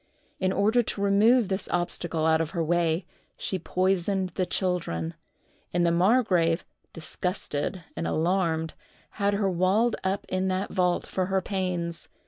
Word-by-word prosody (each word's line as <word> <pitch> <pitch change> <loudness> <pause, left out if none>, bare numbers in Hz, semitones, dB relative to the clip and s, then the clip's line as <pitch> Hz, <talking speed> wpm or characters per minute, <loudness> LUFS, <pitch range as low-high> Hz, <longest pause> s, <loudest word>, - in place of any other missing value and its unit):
In 185 0 +1
order 215 +5 +3
to 215 - -4
remove 210 +4 +4
this 190 0 -3
obstacle 175 -2 -1
out 160 0 +4
of 160 - -2
her 165 - +2
way, 170 +1 +1 0.3
she 190 - -2
poisoned 185 +1 0
the 185 0 -2
children; 125 - -1 0.6
and 175 0 +3
the 170 - +3
margrave, 180 -3 +3 0.3
disgusted 175 0 -3
and - - -2
alarmed, 165 -2 0 0.5
had 200 0 +2
her 200 -1 +1
walled 190 +6 +2
up 190 +1 -1
in 185 0 -1
that 185 +1 -2
vault 180 -2 +1
for 185 -1 -2
her 190 0 +1
pains. 180 -3 -3
185 Hz, 145 wpm, -27 LUFS, 170-195 Hz, 0.6 s, remove